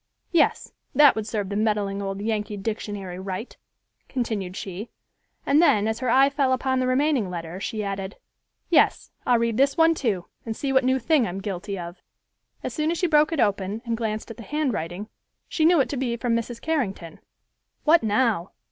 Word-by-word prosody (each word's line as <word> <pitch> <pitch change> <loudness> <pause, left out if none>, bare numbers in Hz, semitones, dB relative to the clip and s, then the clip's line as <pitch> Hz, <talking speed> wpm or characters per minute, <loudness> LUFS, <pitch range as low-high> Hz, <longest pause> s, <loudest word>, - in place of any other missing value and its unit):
Yes, 340 - +2 0.2
that 290 -2 +7
would 220 -1 -3
serve 205 -4 -2
the 200 - -3
meddling 205 -2 0
old 195 0 -4
Yankee 210 -1 -2
Dictionary 200 -3 -4
right," 190 +4 -5 0.5
continued 215 -7 -3
she, 195 +4 -6 0.6
and 290 +3 +4
then, 215 -11 +4
as 220 0 -1
her 255 -2 -1
eye 265 +3 +6
fell 280 -2 +1
upon 260 0 0
the 255 - +1
remaining 260 -5 +2
letter, 170 0 -6
she 215 +2 -3
added, 195 0 -4 0.5
"Yes, - - +3 0.2
I'll 245 - +5
read 230 -1 0
this 275 +4 +3
one 325 0 +5
too, 215 - -1 0.2
and 225 -1 -4
see 275 -2 -2
what 265 0 +4
new 260 +1 +3
thing 270 -1 +2
I'm 180 +2 -4
guilty 200 0 -4
of!" 175 0 -8 0.6
As - - -4
soon 310 0 0
as 340 - 0
she 360 - +1
broke 305 -2 +4
it 325 - -2
open 200 +1 0
and 230 -1 -1
glanced 220 -1 -3
at 225 - -10
the - - -9
handwriting, 215 - -2 0.4
she 315 - +1
knew 340 0 +5
it 270 - +2
to 285 - -3
be 245 -2 -1
from 235 0 0
Mrs. 230 0 -3
Carrington. 200 - -3 0.6
"What 325 +2 +5
now?" 215 -4 +1
225 Hz, 190 wpm, -24 LUFS, 200-265 Hz, 0.6 s, that